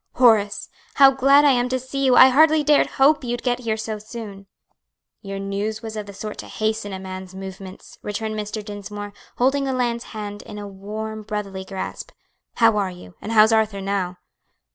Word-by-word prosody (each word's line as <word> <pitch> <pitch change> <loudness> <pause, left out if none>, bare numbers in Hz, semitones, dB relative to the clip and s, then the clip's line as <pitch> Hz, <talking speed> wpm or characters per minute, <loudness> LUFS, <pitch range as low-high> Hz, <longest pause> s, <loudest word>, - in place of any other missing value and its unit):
"Horace! 220 -5 +3 0.3
how 275 -1 +8
glad 275 +2 +5
I 285 - +6
am 245 -1 +1
to 255 - 0
see 260 +2 -4
you! 260 -2 +4
I 260 - +9
hardly 310 +3 +5
dared 295 0 +4
hope 285 +2 +4
you 240 0 -2
could - - -13
get 245 -1 0
here 225 -3 -2
so 220 -1 -4
soon." 210 -3 -9 0.7
"Your 195 0 -6
news 200 +3 -3
was 220 -1 -6
of 210 -1 -5
the 200 - -9
sort 210 +1 -7
to - - -7
hasten 220 -1 -2
a 190 - -4
man's 190 0 -8
movements," 190 0 -10
returned 215 +1 -4
Mr. 210 0 -5
Dinsmore, 205 0 -7 0.2
holding 275 +3 +2
the 265 - -1
lad's 240 -2 -1
hand 205 -2 -7
in 210 - -10
a 205 0 -6
warm 215 +3 -6
brotherly 200 -3 -5
grasp. 190 0 -6 0.5
"How 225 -2 +4
are 200 -2 0
you? 180 - -12
and 220 - -5
how's 220 0 +6
Arthur 220 -2 +1
now?" 195 -2 -2
215 Hz, 195 wpm, -22 LUFS, 200-245 Hz, 0.7 s, I